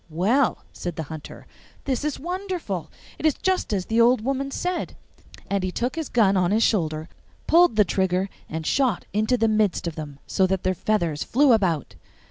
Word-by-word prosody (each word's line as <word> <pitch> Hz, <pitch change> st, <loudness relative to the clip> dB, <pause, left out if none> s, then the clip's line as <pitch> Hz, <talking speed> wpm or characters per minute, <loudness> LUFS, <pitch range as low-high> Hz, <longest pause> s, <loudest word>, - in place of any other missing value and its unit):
'Well,' 215 Hz, -, +1 dB
said 175 Hz, -2 st, -5 dB
the 160 Hz, -, -3 dB
Hunter, 155 Hz, -, -10 dB, 0.4 s
'this 265 Hz, -2 st, -1 dB
is 300 Hz, -2 st, -2 dB
wonderful! 345 Hz, -, -4 dB, 0.3 s
It -, -, -4 dB
is 305 Hz, -, +2 dB
just 375 Hz, -9 st, -1 dB
as 190 Hz, -3 st, -1 dB
the 225 Hz, +1 st, +2 dB
old 240 Hz, 0 st, +4 dB
woman 275 Hz, +3 st, -1 dB
said'; 360 Hz, +5 st, -3 dB, 0.5 s
and 200 Hz, -1 st, -1 dB
he 185 Hz, -, -1 dB
took 245 Hz, +7 st, -2 dB
his 320 Hz, -3 st, -4 dB
gun 205 Hz, -5 st, +3 dB
on 180 Hz, -2 st, +2 dB
his 220 Hz, +3 st, +3 dB
shoulder, 160 Hz, -6 st, 0 dB, 0.4 s
pulled 340 Hz, -7 st, +5 dB
the 210 Hz, -1 st, +5 dB
trigger, 190 Hz, +1 st, 0 dB, 0.2 s
and 160 Hz, 0 st, -4 dB
shot 255 Hz, -, +1 dB
into 215 Hz, +4 st, +2 dB
the 225 Hz, -1 st, +2 dB
midst 215 Hz, -5 st, +1 dB
of 170 Hz, -, -2 dB
them, 150 Hz, -3 st, -7 dB
so 190 Hz, -, +2 dB
that 190 Hz, -1 st, -1 dB
their 185 Hz, -, +1 dB
feathers 170 Hz, -5 st, -1 dB
flew 270 Hz, +1 st, +4 dB
about. 175 Hz, -, +1 dB
215 Hz, 190 wpm, -24 LUFS, 180-260 Hz, 0.5 s, pulled